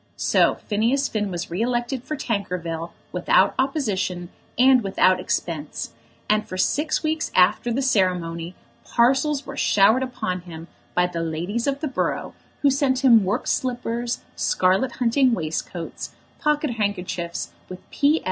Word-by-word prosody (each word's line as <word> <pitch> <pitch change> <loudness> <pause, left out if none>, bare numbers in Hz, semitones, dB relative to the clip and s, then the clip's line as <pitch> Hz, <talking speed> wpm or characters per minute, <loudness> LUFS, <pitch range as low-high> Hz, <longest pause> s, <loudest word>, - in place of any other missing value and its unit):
So - - +3
Phineas 235 +7 +1
Finn 210 -2 -2
was 175 -2 -5
re 180 +5 -2
elected 240 +1 -1
for 305 - -4
Tankerville 180 -8 -3 0.2
without - - +3
opposition 200 - -1 0.3
and 255 +1 +6
without 185 -1 +3
expense; 160 -4 -3 0.3
and 215 0 +1
for 185 - -6
six 300 - 0
weeks 315 +1 -1
after 205 +6 +4
the 270 +4 0
ceremony 180 -7 0 0.3
parcels 270 +4 +2
were 275 - -7
showered 215 +3 +4
upon 215 -8 -3
him 165 -2 -10 0.3
by 180 - +4
the 175 -2 -3
ladies 175 - -2
of 280 +1 -1
the 310 - -1
borough 265 - -2 0.3
who 280 - +5
sent 265 -1 +1
him 230 -5 +7
worked 195 +2 -1
slippers, 240 -1 -2
scarlet 190 +7 +1
hunting 250 +1 +2
waistcoats, 165 0 -5 0.2
pocket 300 -2 +1
handkerchiefs, 180 -4 -3 0.2
with 185 0 -10
"P. 295 +3 +3
220 Hz, 140 wpm, -23 LUFS, 180-265 Hz, 0.3 s, him